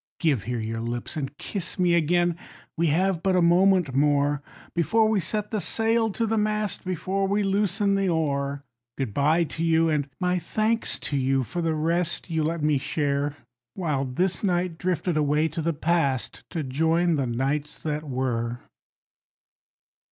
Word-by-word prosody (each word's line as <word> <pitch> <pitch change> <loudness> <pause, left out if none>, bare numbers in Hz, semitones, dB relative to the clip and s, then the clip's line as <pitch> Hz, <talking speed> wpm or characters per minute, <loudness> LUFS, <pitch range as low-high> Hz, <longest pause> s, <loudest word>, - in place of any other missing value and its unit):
Give 140 - +1
here 120 0 -2
your 115 +1 -3
lips 120 +1 -4
and 145 -1 -4
kiss 190 -5 -4
me 180 -2 +3
again, 175 +1 +2 0.4
we 170 0 +1
have 175 +3 +1
but 190 +1 +2
a - - +4
moment 175 -3 +4
more, 145 +1 +2 0.3
Before 220 +6 +3
we 215 -2 +2
set 210 +4 -2
the 215 -3 -1
sail 225 +4 +2
to 230 - 0
the 225 0 +1
mast, 210 -1 -1
before 190 +2 -1
we 205 +1 +1
loosen 200 0 +1
the 195 -1 +1
oar. 140 -4 -1 0.3
Good 130 -7 -3
bye 155 +6 +3
to 160 +1 -4
you, 165 0 +3
and 145 -2 0
my 180 -1 +1
thanks 215 +6 0
to 145 - -2
you, 135 0 +1
for 135 - -4
the 165 -1 0
rest 170 +3 0
you 160 -1 +1
let 160 0 -1
me 150 -2 +3
share, 145 0 -1 0.4
While 150 -7 -1
this 175 +11 -1
night 180 -3 0
drifted 180 -2 -1
away 150 +1 +2
to 165 +2 -4
the 165 +2 +1
Past, 155 -5 -1
to 165 -4 -3
join 160 +6 +1
the 140 -4 0
Nights 140 +5 -1
that 150 -1 -3
Were. 125 -4 -2
165 Hz, 170 wpm, -25 LUFS, 140-185 Hz, 0.4 s, a